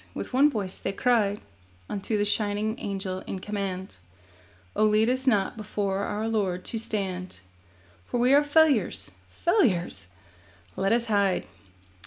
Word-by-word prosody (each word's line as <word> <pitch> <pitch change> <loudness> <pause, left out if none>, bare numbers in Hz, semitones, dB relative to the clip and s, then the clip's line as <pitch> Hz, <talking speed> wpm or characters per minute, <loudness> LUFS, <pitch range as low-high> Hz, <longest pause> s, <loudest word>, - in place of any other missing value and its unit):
With - - -6
one 280 +4 +6
voice 200 -8 -3
they - - -3
cried 210 -3 +2 0.5
Unto 205 +2 -2
the 205 - +1
shining 210 +1 0
Angel 195 -2 -3
in - - -3
command: 190 - -4 0.8
'Oh, 215 - +3
lead 215 +2 +4
us 260 +1 -2
not 205 -6 +2
before 200 -2 -2
our 215 +2 -2
Lord 195 -5 -1
to 225 - -2
stand, 190 - -3 0.7
For 245 - -1
we 250 +3 +4
are 285 - +7
failures, 295 0 +2 0.2
failures! 185 - +1 0.7
Let 195 +1 0
us 235 0 +3
hide. 200 -4 +1
210 Hz, 140 wpm, -27 LUFS, 195-235 Hz, 0.8 s, are